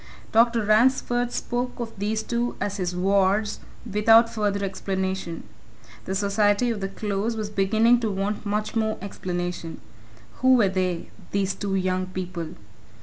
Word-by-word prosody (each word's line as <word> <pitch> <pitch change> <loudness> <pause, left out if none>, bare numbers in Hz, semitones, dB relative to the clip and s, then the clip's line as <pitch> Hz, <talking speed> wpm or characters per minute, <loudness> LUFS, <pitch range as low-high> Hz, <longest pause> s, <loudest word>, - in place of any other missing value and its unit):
Dr. 230 -1 +4
Ransford 245 +2 +3
spoke 245 +1 -3
of 230 -1 -4
these 215 +2 -1
two 240 0 -1
as 205 0 -2
his 180 -2 -2
wards, 195 +3 +2 0.3
without 225 +2 +5
further 205 -2 0
explanation; 190 -3 -3 0.6
the 190 - -2
society 205 +3 +2
of 220 - -3
the 195 - -1
Close 205 +3 -2
was 210 -1 -4
beginning 220 +4 +3
to 225 -2 -1
want 200 +1 -2
much 210 +1 -2
more 220 -1 0
explanation. 175 -3 -4 0.6
Who 260 0 +5
were 215 -6 +4
they 185 -2 -2 0.2
these 195 -1 +1
two 200 -2 -3
young 185 -1 0
people? 180 -3 -5
205 Hz, 145 wpm, -25 LUFS, 190-225 Hz, 0.6 s, without